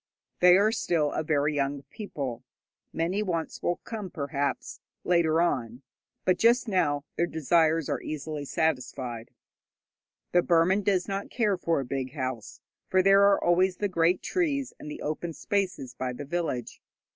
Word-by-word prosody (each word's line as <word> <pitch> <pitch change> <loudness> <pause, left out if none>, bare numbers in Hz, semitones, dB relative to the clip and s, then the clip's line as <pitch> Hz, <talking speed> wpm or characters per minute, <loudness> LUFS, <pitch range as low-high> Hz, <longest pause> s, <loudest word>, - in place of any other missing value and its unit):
They 180 0 +7
are 210 +2 +3
still 165 -9 0
a - - -1
very 150 -1 +1
young 140 -1 -1
people. 140 - -5 0.5
Many 175 +5 -1
wants 170 -6 -3
will 175 - +1
come, 215 -4 -6
perhaps, 140 -3 -3 0.2
later 165 -2 +3
on, 125 -7 -1 0.4
but 180 -1 +2
just 235 +2 +4
now 150 -8 +1
their 170 - +2
desires 160 0 +2
are - - -2
easily 155 0 -5
satisfied. 130 -6 -2 1.0
The 175 - +4
Burman 175 +4 +3
does 190 -3 +1
not 195 0 -3
care 215 -5 +1
for 165 -4 0
a 135 - -3
big 130 +1 -4
house, 130 -6 -5 0.3
for 185 0 +3
there 195 +1 +6
are 200 0 +4
always 180 +1 +3
the 205 - 0
great 175 -1 +1
trees 285 -7 -1
and 150 - -8
the - - -7
open 160 +3 -3
spaces 190 - -2
by 125 +1 -3
the 145 +4 -7
village. 155 -5 -3
165 Hz, 155 wpm, -27 LUFS, 140-185 Hz, 1.0 s, They